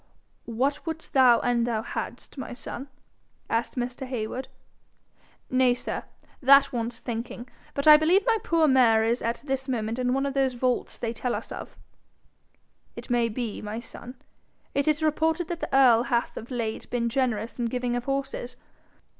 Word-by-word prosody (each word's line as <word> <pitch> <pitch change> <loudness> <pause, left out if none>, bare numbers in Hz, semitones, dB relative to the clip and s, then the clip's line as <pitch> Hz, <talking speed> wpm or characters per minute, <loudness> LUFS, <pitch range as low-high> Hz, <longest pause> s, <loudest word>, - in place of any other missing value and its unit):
'What 265 +5 -1
wouldst 320 -1 -6
thou 255 -3 +6
an' 240 -1 +1
thou 225 -2 -1
hadst, - - -6
my 265 -3 -6
son?' 250 +2 -7 0.6
asked 230 +1 -1
Mr. 250 +1 -4
Heywood. 250 +1 -4 1.0
'Nay, 255 -1 +4
sir, - - -5 0.4
that 275 +1 +6
wants 235 0 -2
thinking. 240 0 -5 0.3
But 280 - -2
I 305 0 +11
believe 350 +6 +3
my 455 -2 +3
poor 330 -2 +3
mare 240 -5 +5
is 230 +2 +1
at 230 +3 -2
this 270 -1 -2
moment 230 -1 -2
in 250 0 +1
one 270 +1 0
of 280 - -2
those 265 -2 +1
vaults 250 0 -1
they 230 -1 -3
tell 245 +1 -2
us - - -7
of.' - - -8 1.2
'It - - -8
may 240 -1 +2
be, 230 -1 -4
my 215 +2 -5
son. 245 +1 -10 0.6
It 280 +1 0
is 305 +1 +2
reported 320 +2 +1
that 345 -1 -3
the - - -4
earl 250 -4 +6
hath 240 -1 -1
of 230 - -8
late 230 -4 -3
been 235 -1 0
generous 235 -2 -1
in 240 - 0
giving 245 +1 -1
of 245 0 -3
horses. 275 -2 -3
250 Hz, 170 wpm, -26 LUFS, 235-275 Hz, 1.2 s, I